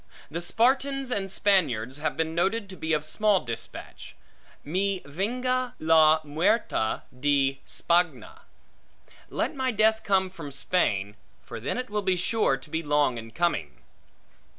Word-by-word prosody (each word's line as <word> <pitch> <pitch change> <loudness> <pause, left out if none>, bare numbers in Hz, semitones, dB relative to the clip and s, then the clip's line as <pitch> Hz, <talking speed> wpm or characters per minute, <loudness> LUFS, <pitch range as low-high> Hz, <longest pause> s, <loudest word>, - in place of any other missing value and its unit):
The 170 +3 -3
Spartans 265 +7 +1
and 195 -4 -1
Spaniards 140 - +1
have 155 +1 -2
been 160 0 -1
noted 195 +6 0
to 190 - -8
be 160 -2 -4
of 150 -1 +1
small 205 +4 +2
dispatch; 115 -1 -7 0.5
Mi 190 +5 -1
venga 250 - -1
la 160 -1 +5
muerte 150 - 0 0.2
de 135 -1 +1
Spagna; 175 0 0 0.9
Let - - -2
my 260 -1 0
death 220 -1 +3
come 190 -2 +1
from 165 -6 -8
Spain; 105 - 0 0.3
for - - -8
then 125 - -3
it 250 -3 -5
will 210 0 0
be 190 -2 +1
sure 180 - +1
to 135 +3 -14
be 160 - -1
long 145 -5 +1
in 115 0 -9
coming. 110 - -2
170 Hz, 145 wpm, -26 LUFS, 145-210 Hz, 0.9 s, la